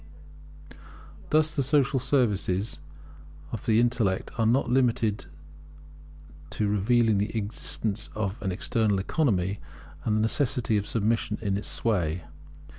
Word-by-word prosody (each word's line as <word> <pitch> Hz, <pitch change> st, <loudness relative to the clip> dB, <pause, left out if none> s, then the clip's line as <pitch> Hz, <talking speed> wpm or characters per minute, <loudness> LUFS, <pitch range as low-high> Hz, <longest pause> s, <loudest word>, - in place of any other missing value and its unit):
Thus 155 Hz, 0 st, +3 dB
the 140 Hz, -, 0 dB
social 140 Hz, 0 st, +2 dB
services 110 Hz, -7 st, 0 dB, 0.7 s
of 110 Hz, -, -6 dB
the 110 Hz, 0 st, +4 dB
Intellect 115 Hz, -6 st, +1 dB
are 115 Hz, -2 st, +1 dB
not 125 Hz, +5 st, +2 dB
limited 120 Hz, -4 st, +1 dB, 1.2 s
to 105 Hz, -, -1 dB
revealing 110 Hz, +1 st, +2 dB
the 105 Hz, +3 st, -2 dB
existence 105 Hz, 0 st, -2 dB
of 100 Hz, -1 st, -3 dB
an 95 Hz, -2 st, -1 dB
external 105 Hz, +2 st, +1 dB
Economy, 100 Hz, -, 0 dB, 0.4 s
and 105 Hz, -, +1 dB
the -, -, +2 dB
necessity 120 Hz, -1 st, +1 dB
of 105 Hz, 0 st, 0 dB
submission 110 Hz, -1 st, 0 dB
to 100 Hz, -3 st, -2 dB
its 100 Hz, -, -4 dB
sway. 90 Hz, -7 st, -1 dB
110 Hz, 120 wpm, -27 LUFS, 100-120 Hz, 1.2 s, the